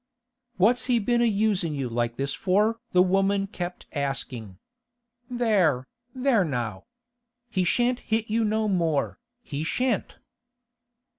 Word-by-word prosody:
'What's 240 +7 +3
he 250 -2 +3
been 235 +2 +1
a - - +4
usin' 200 -7 +1
you 135 -3 -2
like 120 0 -2
this 140 0 -1
for?' 210 +4 +1
the 180 0 +5
woman 195 +1 +2
kept 180 -3 -6
asking. 130 - -3 0.7
'There, 200 - +2 0.3
there 255 -5 +3
now! 120 - -3 0.7
He 185 - +1
shan't 245 +7 +2
hit 220 0 -1
you 225 +2 +1
no 215 0 +1
more, 165 - 0 0.2
he 145 0 -4
shan't! 245 +5 -1
195 Hz, 130 wpm, -26 LUFS, 145-225 Hz, 0.7 s, the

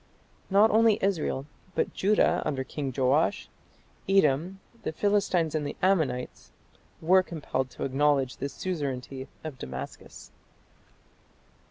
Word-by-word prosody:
Not 205 +3 +5
only 220 -1 +5
Israel, 165 -8 -1 0.3
but - - 0
Judah, 205 +3 +2
under 140 -3 -2
King 135 +1 -4
Joash, 140 +8 +2 0.6
Edom, 180 0 +2 0.2
the - - -3
Philistines 190 -3 +1
and 155 -1 -1
the 145 - -4
Ammonites 155 -10 0 0.5
were 185 +4 +5
compelled 145 -7 -3
to - - -7
acknowledge 135 -1 +1
the 140 - -3
suzerainty 135 -5 -4 0.2
of 150 -5 -7
Damascus. 65 - -8
155 Hz, 115 wpm, -28 LUFS, 135-190 Hz, 0.6 s, Not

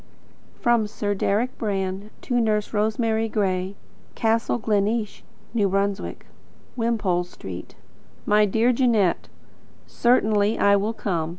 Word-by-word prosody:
From 235 -3 +2
Sir 205 -1 -2
Deryck 210 +5 0
Brand 195 -1 -2
to 245 -2 0
Nurse 215 -1 0
Rosemary 220 +1 0
Gray, 190 -2 -1 0.4
Castle 225 +1 +1
Gleneesh, 215 0 -1 0.3
N. 200 -1 +2
B. - - -5 0.6
Wimpole 215 -7 0
Street. 95 - -9 0.5
My 210 0 +4
dear 225 +5 +2
Jeanette: 230 -8 +2 0.6
Certainly 215 -3 +2
I 200 0 +4
will 205 +3 0
come. 170 -8 -2
210 Hz, 110 wpm, -24 LUFS, 200-225 Hz, 0.6 s, My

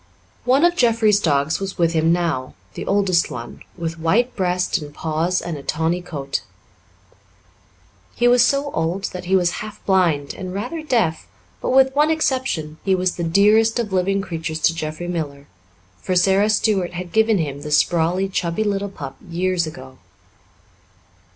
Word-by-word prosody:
One 265 +6 +4
of 350 0 +3
Jeffrey's 225 - +3
dogs 145 -3 +1
was 195 -1 -5
with 170 -2 +2
him 160 0 +2
now 165 -7 -1 0.2
the - - -7
oldest 195 -4 +2
one, 120 -1 -8 0.2
with 165 -1 -4
white 225 +10 +1
breast 180 -1 0
and 150 -2 -9
paws 160 +4 -1
and 170 -3 -4
a - - -8
tawny 160 +5 -1
coat. 140 -6 -4 1.7
He 240 - +2
was 245 0 +6
so 280 +2 +1
old 175 +4 -2
that 180 0 -6
he 190 +2 +2
was 175 -2 +1
half 215 -1 -9
blind 170 -7 +2
and 185 -1 -7
rather 315 +11 -4
deaf, 230 - 0 0.3
but, - - -2
with 265 +1 +4
one 300 +2 +3
exception, 260 - -1
he 190 -1 +2
was 185 0 0
the 170 - -3
dearest 210 +7 +4
of 220 -5 -2
living 195 +2 +1
creatures 160 -3 -4
to 165 - +3
Jeffrey 155 +1 -5
Miller, 145 -5 -4 0.6
for 185 - -1
Sara 195 +3 +3
Stuart 205 -4 +1
had 175 0 -6
given 220 -1 +3
him 145 -4 -3
the 150 - -6
sprawly, 170 +4 +2
chubby 180 +1 -1
little 200 -1 -1
pup 140 -8 -8
years 175 0 0
ago. 130 -4 -10
180 Hz, 165 wpm, -21 LUFS, 160-210 Hz, 1.7 s, was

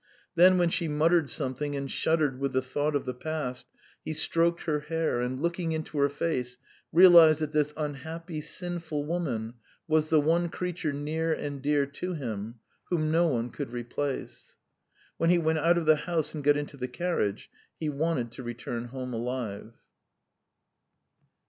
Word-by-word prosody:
Then 185 +1 +6
when 175 -1 +3
she 170 0 0
muttered 160 0 +2
something 145 +1 -3
and 140 0 -3
shuddered 150 -5 +1
with 140 -1 -1
the 130 - +2
thought 145 +3 -1
of 145 - -1
the 125 - -3
past, 130 -1 -4 0.4
he 155 - -3
stroked 170 +2 +1
her 150 -3 0
hair, 155 -4 -1
and 125 +1 -2
looking 170 +1 -1
into 155 -1 -3
her 140 0 +4
face, 125 -4 -2 0.3
realised 170 -3 +8
that 155 -1 -2
this 150 -1 +1
unhappy, 155 +2 -5
sinful 165 -3 -3
woman 135 -10 -2 0.3
was 155 -1 +2
the 155 - +5
one 165 +3 +2
creature 180 -3 -3
near 155 +3 -2
and 145 -3 -3
dear 145 0 +2
to 180 +6 -5
him, 115 -5 -5 0.3
whom 155 -3 0
no 170 +2 +4
one 120 -5 -1
could 145 -4 -5
replace. 125 +3 -5 0.6
When 165 - +2
he 175 - +5
went 160 -1 +1
out 170 +3 +4
of 170 - -1
the 155 0 +6
house 160 0 -2
and 150 -2 -5
got 145 +1 +4
into 145 0 -5
the 125 -1 -3
carriage 125 - -2 0.3
he 155 - -2
wanted 145 -5 -1
to 125 - -9
return 120 0 -5
home 125 0 -6
alive. 115 -3 -4
150 Hz, 170 wpm, -28 LUFS, 130-165 Hz, 0.6 s, realised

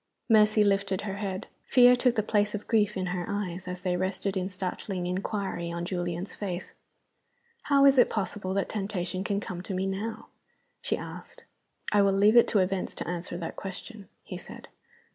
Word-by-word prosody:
Mercy 215 -1 +5
lifted 195 -1 +1
her 200 -1 -4
head. 195 -1 -3 0.2
Fear 250 -1 +6
took 245 -1 +2
the 215 - +1
place 210 0 +1
of 210 - -6
grief 210 -3 +2
in 185 - -1
her 180 -2 -2
eyes, 185 -3 -3
as 180 0 -5
they 180 -2 +1
rested 190 +2 -1
in 185 0 -1
startled 185 +1 -4
inquiry 185 -1 -2
on 170 0 -3
Julian's 175 0 -3
face. 185 -3 -5 0.9
"How 280 -1 +5
is 275 -1 +6
it - - +6
possible 195 -2 -2
that 200 - +1
temptation 190 -3 -3
can 200 0 0
come 180 -3 -6
to 190 +1 -5
me 185 +1 0
now?" 200 +4 -4 0.5
she - - -1
asked. - - -9 0.5
"I 205 - +5
will 200 -1 +4
leave 205 +3 +5
it 235 - +7
to 215 - +1
events 185 0 -1
to - - -5
answer 175 0 -4
that 170 -2 -5
question," 200 +2 -8
he - - -7
said. - - -11
195 Hz, 185 wpm, -28 LUFS, 185-210 Hz, 0.9 s, it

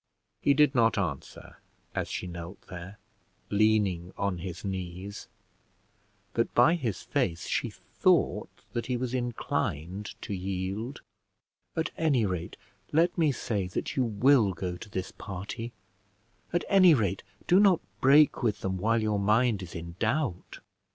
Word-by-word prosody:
He 140 - +4
did 150 -1 +5
not 115 -4 +3
answer, 80 -9 -4 0.4
as - - -2
she - - -4
knelt 85 +1 -7
there, 90 +3 -9 0.5
leaning 100 -4 +2
on 100 -3 -1
his 90 +1 -6
knees, 95 +1 -5 1.1
but - - 0
by 165 - +6
his 120 - -2
face 85 +1 -1
she - - 0
thought - - +1 0.2
that 120 - -2
he 125 -1 0
was 125 0 -3
inclined 105 - -3
to - - -4
yield. 95 +6 -3 0.7
"At 160 -1 -1
any 140 -9 +3
rate 90 -3 -3 0.3
let 165 +3 +3
me 160 -4 +3
say 105 -6 -2
that 90 - -4
you 130 - +2
will 115 -1 +4
go 90 +1 -4
to 90 - -10
this 95 -2 -4
party. 100 +5 -6 0.8
At 175 - 0
any 185 -5 +7
rate 100 -6 0 0.2
do 180 - +5
not 195 -4 +5 0.2
break 145 +3 +5
with 110 -5 0
them 95 -1 -2
while 115 +3 +2
your 105 -1 +1
mind 110 +1 +3
is 90 -1 -8
in 85 +1 -7
doubt." 115 - -1
105 Hz, 145 wpm, -29 LUFS, 95-130 Hz, 1.1 s, any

